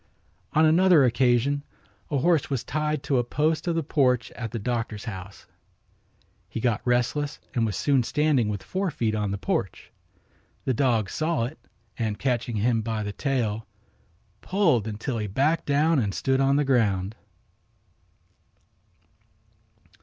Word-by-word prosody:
On 155 +1 +5
another 170 -1 +5
occasion 125 +3 +2 0.5
a 145 - 0
horse 165 +2 +2
was 135 -4 -1
tied 150 -1 -2
to 140 -3 +1
a - - +1
post 155 +7 0
of 170 - +1
the 165 - 0
porch 130 -4 +1
at 115 -1 -6
the 115 - -5
doctor's 115 -1 -3
house. 100 -3 -8 1.0
He - - -4
got 115 -2 0
restless 125 +4 0 0.2
and 115 -4 +1
was 105 - -3
soon 140 -3 +2
standing 140 -3 +1
with 100 -2 -4
fore 190 0 -2
feet 115 -7 -1
on 105 -2 -1
the 100 - -2
porch. 95 - -3 0.7
The 130 - +1
dog 115 -6 +1
saw 155 -5 0
it 130 +7 -5 0.4
and, 110 -3 -1
catching 120 -3 -1
him 115 +2 +1
by 110 -1 -3
the 105 0 -4
tail, 115 -6 -1 0.7
pulled 165 - +2
until 110 +3 -3
he 105 - -2
backed 140 +11 +1
down 150 +2 +3
and 100 -5 -1
stood 135 0 +1
on 135 +1 +3
the 145 0 +2
ground. 105 -6 +1
125 Hz, 150 wpm, -25 LUFS, 110-150 Hz, 1.0 s, On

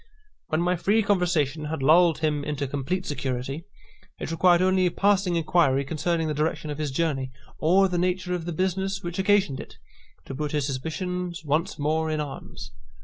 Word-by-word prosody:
When 155 +1 0
my 180 +1 +2
free 210 +6 +2
conversation 170 -7 +1
had 150 -2 -3
lulled 165 +2 +5
him 150 -2 0
into 145 -1 -2
complete 145 +8 -2
security, 135 +2 -3 0.5
it - - -4
required 175 +1 +4
only 185 -1 +3
a - - -1
passing 195 -2 +2
inquiry 155 -5 +2
concerning 165 +3 -1
the 155 - -1
direction 150 0 -1
of 145 - -6
his 150 -2 -1
journey, 135 -2 -1 0.3
or 185 +5 +4
the 180 -2 -1
nature 180 0 0
of 175 -2 -3
the 175 - -3
business 190 +3 -1
which 175 +2 -4
occasioned 190 -8 +2
it, - - -10 0.5
to - - -7
put 150 +2 -3
his 145 -3 +1
suspicions 175 +5 -4
once 160 +7 0
more 155 +2 0
in 155 -1 -1
arms. 145 -2 -7
165 Hz, 180 wpm, -25 LUFS, 150-180 Hz, 0.5 s, lulled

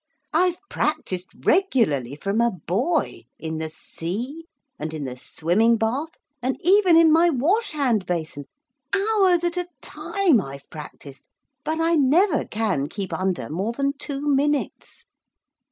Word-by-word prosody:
I've 360 -1 +3
practised 185 - -3
regularly, 215 - +2
from 200 +8 -1
a 235 - +4
boy, 230 - -1
in 160 -1 -5
the 160 0 -3
sea, 235 - -6 0.3
and 160 +1 -4
in 150 - -4
the 130 -2 -5
swimming 185 - +1
bath, 245 +9 -1 0.3
and 255 +2 -1
even 370 -1 +5
in 330 -1 +6
my 330 +2 +5
wash 340 - +1
hand 245 -10 +1
basin 160 -5 -3 0.5
hours 390 -4 +3
at 345 +1 -1
a 355 -1 -1
time 365 - +1
I've 140 -2 -9
practised 145 -2 -10 0.4
but 320 +1 -2
I 330 +1 +2
never 305 +5 +3
can 205 -10 -1
keep 195 +3 -5
under 185 -1 -1
more 190 +9 -2
than 275 +2 0
two 285 0 -4
minutes.' 290 0 -1
250 Hz, 140 wpm, -23 LUFS, -, 0.5 s, in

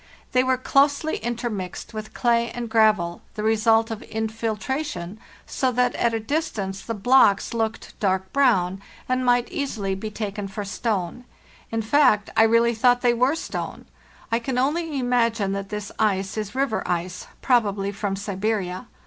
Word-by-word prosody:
They 255 0 +3
were 260 0 +2
closely 285 +4 +2
intermixed 230 -5 -4
with 215 0 -7
clay 235 -1 +2
and 235 0 -6
gravel, 210 -7 +3
the 210 - -4
result 225 +1 +3
of 220 - -5
infiltra 220 +5 -2
tion, 210 - -6 0.3
so 260 -1 0
that 250 +1 +2
at 235 - +1
a - - 0
distance 215 -8 -2
the 230 - -4
blocks 210 -1 +4
looked 225 -1 -3
dark 190 -1 0
brown, 195 -9 +2 0.3
and 255 0 0
might 245 -1 +3
easily 220 -9 -2
be 195 +3 -4
taken 205 -1 -4
for 200 +1 -5
stone; 205 +1 -2 0.5
in 225 0 -1
fact, 225 -4 +3
I - - +5
really 230 +1 +4
thought 245 +2 +3
they 245 -1 +4
were 250 +5 +2
stone. 325 - -5 0.5
I 230 - +2
can 250 +1 -3
only 300 +3 0
imagine 235 -5 +1
that 195 0 -4
this 210 -1 -5
ice 195 -3 +1
is 215 +1 -4
river 265 -4 0
ice, 180 +1 -3 0.2
probably 205 -6 +2
from 200 -1 -3
Siberia. 200 0 -2
225 Hz, 160 wpm, -24 LUFS, 200-245 Hz, 0.5 s, I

